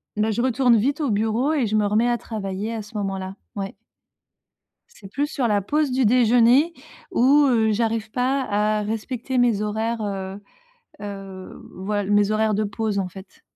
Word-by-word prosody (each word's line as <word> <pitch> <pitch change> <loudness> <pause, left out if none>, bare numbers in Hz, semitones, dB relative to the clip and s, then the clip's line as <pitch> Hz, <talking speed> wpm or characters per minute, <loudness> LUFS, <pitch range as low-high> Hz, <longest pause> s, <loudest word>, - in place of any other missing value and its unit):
bah, 215 +1 +1
je 230 - -1
retourne 250 -1 +3
vite 275 +8 0
au 280 -7 0
bureau 225 +7 +1
et 265 -8 +1
je 215 - -1
me 210 -1 +2
remets 215 +4 +2
à 240 - +1
travailler, 210 -1 -5
à 225 - -4
ce 210 +2 -14
moment-là». 195 -1 -3 0.2
Ouais. 195 -1 -4 1.1
C'est 215 - -14
plus 280 +7 -1
sur 255 -5 0
la 205 -2 +2
pause 295 +8 0
du 255 0 +1
déjeuner 245 +6 +4 0.4
où, 280 +4 +4
heu, 220 -3 +3
j'arrive 225 0 -1
pas 260 +3 0
à 210 -1 0
respecter 230 +4 -3
mes 240 -4 +3
horaires, 220 +2 -2
heu 195 -1 -4 0.6
heu, 195 -2 -8
voil 205 +1 -2
mes 205 0 +3
horaires 215 0 +1
de 215 +2 0
pause, 210 0 -2
en 185 - -3
fait. 190 +1 -14
220 Hz, 175 wpm, -23 LUFS, 205-245 Hz, 1.1 s, déjeuner